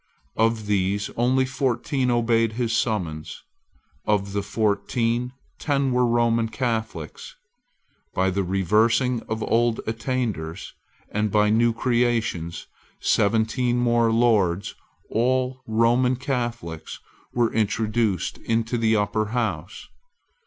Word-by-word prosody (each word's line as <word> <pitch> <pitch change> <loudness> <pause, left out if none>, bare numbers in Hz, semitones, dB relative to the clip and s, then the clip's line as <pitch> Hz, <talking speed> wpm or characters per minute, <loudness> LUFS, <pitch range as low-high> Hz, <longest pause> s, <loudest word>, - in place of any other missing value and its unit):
Of 115 -1 +1
these 100 0 0
only 130 +2 +2
fourteen 130 0 -1
obeyed 115 -2 +2
his 115 0 -1
summons. 85 -10 -2 0.6
Of 100 -2 +1
the 100 - 0
fourteen, 115 +4 0 0.3
ten 140 -3 0
were 125 0 +3
Roman 115 -1 +2
Catholics. 120 - -4 0.8
By 95 +1 +2
the 100 +2 0
reversing 110 +7 +2
of 110 0 -2
old 115 0 +1
attainders, 110 -8 -3 0.4
and 105 +1 0
by 105 +1 +3
new 115 +2 +3
creations, 115 -8 -1 0.3
seventeen 115 +3 +1
more 120 -1 +3
Lords, 105 -6 +2 0.4
all 130 +2 0
Roman 120 +3 +3
Catholics, 120 - -4 0.4
were 120 -2 +2
introduced 110 -3 0
into 115 +1 -1
the 110 -1 +3
Upper 105 +1 0
House. 105 -7 -3
115 Hz, 105 wpm, -24 LUFS, 105-120 Hz, 0.8 s, were